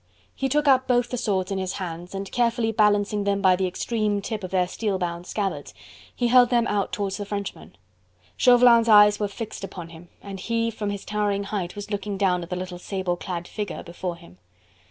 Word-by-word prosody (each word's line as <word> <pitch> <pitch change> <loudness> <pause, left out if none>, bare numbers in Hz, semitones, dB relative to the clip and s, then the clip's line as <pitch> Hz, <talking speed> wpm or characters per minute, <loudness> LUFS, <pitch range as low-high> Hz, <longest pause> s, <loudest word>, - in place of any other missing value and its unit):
He 270 - -2
took 295 +2 +1
up 260 -1 +4
both 245 -1 +2
the - - -3
swords 200 -5 -1
in 195 - -1
his 185 -1 -3
hands 175 0 -6
and 195 0 -5
carefully 235 -2 +1
balancing 210 -1 +2
them 200 0 +1
by 190 -2 +4
the 190 0 0
extreme 210 +2 -1
tip 215 +1 -5
of 185 - -4
their 180 -1 +1
steel 205 +1 -2
bound 175 -1 -4
scabbards, 200 -3 -3 0.4
he 240 - +1
held 245 0 +6
them 240 -2 +2
out 200 -3 -1
towards 200 -2 -2
the 205 - -4
Frenchman. 200 - -6 0.6
Chauvelin's 240 -2 +6
eyes 210 -1 +7
were 205 - 0
fixed 205 0 -7
upon 175 -3 -7
him, 165 +1 -13
and 195 -1 -7
he 230 +2 -1
from 210 -2 -4
his 200 -1 -5
towering 205 -1 -1
height 195 -3 -4
was 205 +1 -7
looking 200 0 -3
down 185 -2 +2
at 170 - -8
the 180 - -2
little 180 -1 -6
sable 185 -1 -2
clad 175 -1 -5
figure 210 -4 -5
before 175 +1 -5
him. 170 - -17
200 Hz, 210 wpm, -24 LUFS, 185-225 Hz, 0.6 s, eyes